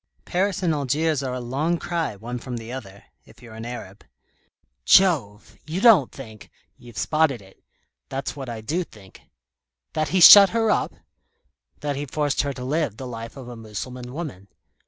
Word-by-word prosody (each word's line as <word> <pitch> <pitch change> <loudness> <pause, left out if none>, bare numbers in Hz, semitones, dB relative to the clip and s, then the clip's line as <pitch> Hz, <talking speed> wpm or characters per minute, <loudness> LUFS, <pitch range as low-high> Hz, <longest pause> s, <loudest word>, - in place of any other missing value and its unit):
Paris 195 +1 -1
and 165 -3 +2
Algiers 150 +1 0
are 130 -2 -3
a - - -4
long 140 +8 -1
cry, 165 -10 -3
one 120 +4 -6
from 125 0 -6
the 115 +1 -8
other 100 -7 -9 0.2
if - - -20
you're 115 -2 -13
an 115 +1 -7
Arab." 105 -5 -9 0.8
"Jove! 125 - +3
You 165 +4 -3
don't 195 - +6
think 110 -6 -12
" - - -46
"You've 120 -3 -14
spotted 155 -5 +1
it. 95 -1 -19 0.5
That's 135 +1 -4
what 135 -3 -7
I 115 -2 -6
do 160 +12 -2
think." 100 - -17 0.7
"That 155 -1 0
he 185 - +1
shut 200 +3 +11
her 225 -1 +2
up?" - - -1 0.9
"That 145 -2 -2
he 145 +1 -4
forced 145 +1 0
her 140 -1 -3
to 125 -1 -7
live 145 -5 -1
the 130 - -7
life 115 0 -8
of 130 -3 -9
a 120 - -8
Mussulman 120 +3 -7
woman. 135 - -7
130 Hz, 180 wpm, -23 LUFS, 115-155 Hz, 0.9 s, shut